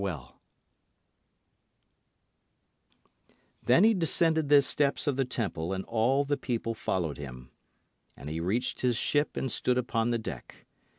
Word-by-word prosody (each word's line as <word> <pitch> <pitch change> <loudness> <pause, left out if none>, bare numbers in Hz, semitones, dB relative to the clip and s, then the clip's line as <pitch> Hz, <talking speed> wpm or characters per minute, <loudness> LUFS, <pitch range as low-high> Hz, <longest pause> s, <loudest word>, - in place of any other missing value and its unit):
Then 130 +10 +4
he 225 +1 +6
descended 160 -4 +2
the 145 -1 +7
steps 145 +1 0
of 145 -3 +1
the 135 0 0
Temple 95 -8 -3
and 95 0 -4
all 125 +5 +1
the 145 0 0
people 115 -3 -3
followed 85 - -2
him. 65 -3 -9 0.7
And 70 - -10
he 80 +2 -4
reached 100 +9 -1
his 125 -2 +1
ship 145 +4 0
and 130 - -2
stood 125 +3 0
upon 120 -2 0
the 120 - +1
deck. 110 - -8
120 Hz, 130 wpm, -29 LUFS, 95-140 Hz, 0.7 s, the